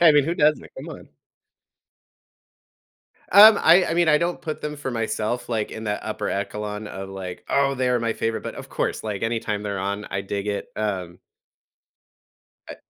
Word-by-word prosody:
I 170 -2 +8
mean, 145 -2 +4
who 165 - -1
doesn't? 150 -2 +2
Come - - -8
on. - - -10 2.2
Um, 210 +1 +9
I 180 +2 +6
I 165 - -1
mean, 170 -1 +3
I 150 -1 +5
don't 175 +1 -1
put 155 -1 -5
them 150 0 -4
for 145 -2 -4
myself, 115 +1 -2
like, 110 -3 -1
in 110 - -7
that 105 -1 -2
upper - - -4
echelon 105 +1 -3
of 95 0 -7
like, 95 -2 -7
"Oh, 140 0 +2
they're 125 -1 +1
my 115 -1 0
favorite," 115 0 -2
but - - -6
of - - -9
course, - - -2
like, 105 -3 -4
anytime 115 -2 -2
they're 100 -1 -3
on, 100 +2 -3
I 100 - -2
dig 100 +1 -4
it, 100 - -3
um 95 -5 -3 1.5
I - - -8
110 Hz, 180 wpm, -23 LUFS, 100-145 Hz, 2.2 s, Um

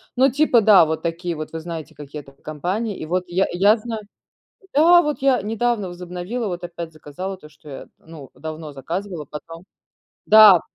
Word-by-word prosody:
ну, 260 +1 +4
типа 275 -4 +3
да, 200 -6 +7
вот 160 0 -3
такие 170 0 -3
вот, 155 0 -7
вы 165 - -5
знаете, 165 -1 -7
какие 145 +1 -9
это 135 0 -17
компании. 180 +10 -4
И - - -6
вот 180 +3 -1
я 180 +2 +1
я 200 +5 +4
знаю 220 0 -6 0.7
да, 345 +4 +6
вот 300 -1 -2
я 265 -6 +3
недавно 225 -2 -1
возобновила, 180 +6 -5
вот 175 -1 -5
опять 170 -1 -7
заказала 155 +6 -7
то, 150 -4 -15
что 150 0 -18
я, 135 - -9
ну, 160 -4 -13
давно 155 -1 -7
заказывала, 170 +4 -5
потом 165 +5 -10 0.6
да, 210 -5 +8
175 Hz, 180 wpm, -21 LUFS, 160-215 Hz, 0.7 s, да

